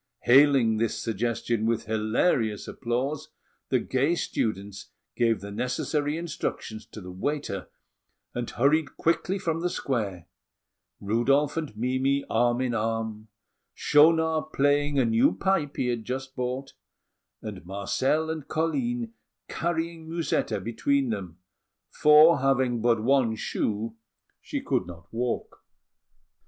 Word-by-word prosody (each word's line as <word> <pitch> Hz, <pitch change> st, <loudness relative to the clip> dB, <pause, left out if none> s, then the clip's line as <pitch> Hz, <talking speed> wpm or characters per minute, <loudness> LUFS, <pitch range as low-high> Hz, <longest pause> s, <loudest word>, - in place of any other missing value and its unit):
Hailing 130 Hz, -4 st, +5 dB
this 115 Hz, 0 st, -1 dB
suggestion 115 Hz, 0 st, -1 dB
with 115 Hz, -1 st, 0 dB
hilarious 110 Hz, -, 0 dB
applause, 135 Hz, +5 st, -3 dB, 0.4 s
the 130 Hz, -, +3 dB
gay 135 Hz, +7 st, +1 dB
students 100 Hz, -, -3 dB, 0.3 s
gave 115 Hz, -2 st, +2 dB
the 100 Hz, 0 st, -7 dB
necessary 145 Hz, +7 st, -1 dB
instructions 135 Hz, -9 st, -5 dB
to 110 Hz, -, -10 dB
the 90 Hz, 0 st, -8 dB
waiter, 100 Hz, -1 st, -3 dB, 0.6 s
and 120 Hz, -1 st, -3 dB
hurried 145 Hz, +3 st, +1 dB
quickly 175 Hz, +3 st, +1 dB
from 165 Hz, -4 st, -1 dB
the 180 Hz, +1 st, 0 dB
square, 105 Hz, -, -3 dB, 0.7 s
Rudolf 135 Hz, +8 st, +2 dB
and 155 Hz, -10 st, -4 dB
Mimi 130 Hz, +4 st, 0 dB
arm 120 Hz, +2 st, +2 dB
in 125 Hz, -2 st, 0 dB
arm, 110 Hz, -1 st, -2 dB, 0.5 s
Schaunard 160 Hz, +1 st, +3 dB
playing 145 Hz, +1 st, +2 dB
a 130 Hz, -, +4 dB
new 115 Hz, -4 st, +3 dB
pipe 160 Hz, -, 0 dB
he 125 Hz, -, 0 dB
had 120 Hz, -2 st, -2 dB
just 130 Hz, +2 st, -5 dB
bought, 125 Hz, +2 st, -3 dB, 0.7 s
and 105 Hz, -4 st, -7 dB
Marcel 130 Hz, -, 0 dB
and 155 Hz, -3 st, -6 dB
Colline 235 Hz, -, -1 dB, 0.3 s
carrying 165 Hz, -1 st, -3 dB
Musetta 165 Hz, -10 st, -1 dB
between 120 Hz, +5 st, 0 dB
them, 95 Hz, -6 st, -5 dB, 0.5 s
for, 155 Hz, +2 st, +6 dB
having 130 Hz, -3 st, +1 dB
but 115 Hz, -2 st, +2 dB
one 125 Hz, -3 st, +3 dB
shoe, 110 Hz, +1 st, -2 dB, 0.5 s
she -, -, -4 dB
could 90 Hz, -, -1 dB
not 85 Hz, +1 st, -12 dB
walk. 120 Hz, +1 st, -3 dB
125 Hz, 120 wpm, -27 LUFS, 110-150 Hz, 0.7 s, for